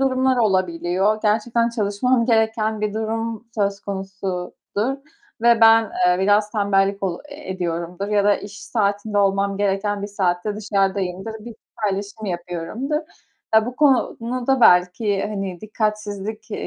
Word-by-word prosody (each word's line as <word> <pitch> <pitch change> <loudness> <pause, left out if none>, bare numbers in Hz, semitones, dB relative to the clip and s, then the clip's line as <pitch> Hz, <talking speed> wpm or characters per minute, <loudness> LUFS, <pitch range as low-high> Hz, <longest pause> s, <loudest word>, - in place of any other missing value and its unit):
durumlar 260 -1 +2
olabiliyor. 185 -1 +1
Gerçekten 230 +2 +2
çalışmam 230 +2 +1
gereken 220 -2 +1
bir 210 -1 -2
durum 225 0 -3
söz 200 -2 0
konusudur 195 +4 -4 0.5
ve 235 -1 +5
ben, 225 0 +7 0.2
eee, 180 0 +3
biraz 205 +2 +3
tembellik 200 -2 +1
ol 180 -3 -1
e 290 -5 -9
ediyorumdur 175 +1 -3
ya 205 -1 +2
da 205 0 +4
iş 205 0 -10
saatinde 205 -1 0
olmam 195 0 +1
gereken 205 0 0
bir 205 - -2
saatte 200 0 -1
dışarıdayımdır, 195 -1 -1
bir 235 -1 -8 0.3
paylaşım 205 +2 -4
yapıyorumdur. 180 - -3 0.6
Ya 220 0 +5
bu 245 +1 -6
konuda 255 -2 +1
belki 185 +1 +4
hani 195 -4 -4
dikkatsizlik, 215 0 -3
eee, - - -4
205 Hz, 130 wpm, -21 LUFS, 195-225 Hz, 0.6 s, ben